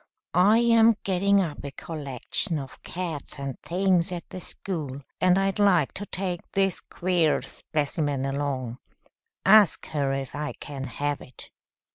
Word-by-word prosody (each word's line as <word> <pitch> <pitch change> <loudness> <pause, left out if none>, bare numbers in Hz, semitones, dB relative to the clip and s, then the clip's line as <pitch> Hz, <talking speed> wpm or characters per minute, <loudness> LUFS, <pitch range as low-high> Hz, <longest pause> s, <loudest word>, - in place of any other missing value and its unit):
I 195 +6 +6
am 230 -1 +5
getting 200 +1 +3
up 160 -6 -4
a 140 - -4
collection 150 - -3
of 135 -2 -8
cats 165 -5 -5
and 140 -2 -5
things 180 -1 +1
at 175 -1 -5
the 185 - -6
school, 150 -8 -5 0.2
and 185 0 +4
I'd 195 +1 +1
like 180 -8 +4
to 205 +1 -6
take 185 -2 -3
this 195 -2 +2
queer 170 -6 +1
specimen 145 -1 -2
along. 135 -3 -2 0.7
Ask 210 -2 +6
her 140 -3 0
if 135 -1 -4
I 150 +1 -3
can 135 -2 -6
have 145 +1 -2
it." 125 - -13
165 Hz, 145 wpm, -26 LUFS, 140-190 Hz, 0.7 s, I